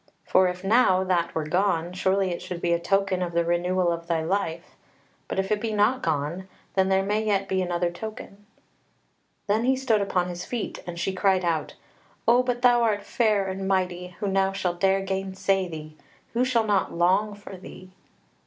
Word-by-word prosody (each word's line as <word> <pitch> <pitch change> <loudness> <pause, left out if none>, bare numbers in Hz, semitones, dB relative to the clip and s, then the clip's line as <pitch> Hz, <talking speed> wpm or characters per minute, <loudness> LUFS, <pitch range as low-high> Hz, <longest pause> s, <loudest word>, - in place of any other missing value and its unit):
For 185 0 +4
if 180 +1 -4
now 195 -3 +4
that 175 -2 0
were 160 - 0
gone, 175 0 0
surely 190 0 +1
it 170 - -4
should 180 - -6
be 170 0 +1
a 170 - +1
token 195 +1 +1
of 175 -1 -2
the 170 0 +1
renewal 175 +1 +1
of 170 0 -4
thy 165 -2 0
life. 170 -1 -2 0.5
But - - -4
if 195 +1 -1
it 210 -1 +1
be 225 -1 -2
not 215 +5 +2
gone, 160 +4 -2 0.3
then 190 0 +2
there 190 0 +3
may 210 +2 0
yet 200 -2 0
be 190 0 0
another 175 -1 -1
token." 205 +1 -9 1.0
Then 215 +2 +1
he 265 +1 +3
stood 240 -5 +1
upon 180 -2 0
his 175 0 -5
feet, 240 +1 -4
and 170 -1 -6
she 190 - -1
cried 190 -1 +2
out: 165 -2 -1 0.5
"O 240 +2 +6
but 245 -1 -2
thou 245 -1 +5
art 215 -3 +1
fair 215 -4 +1
and 190 0 -4
mighty, 180 -2 -1
who 205 - -2
now 195 0 +1
shall 185 -2 -1
dare 195 +2 +2
gainsay 195 0 -1
thee? 155 -2 -8 0.4
Who 245 +2 +2
shall 235 -3 +2
not 205 -3 +1
long 190 +5 +2
for 205 -1 -10
thee?" 185 0 -12
190 Hz, 195 wpm, -25 LUFS, 175-205 Hz, 1.0 s, O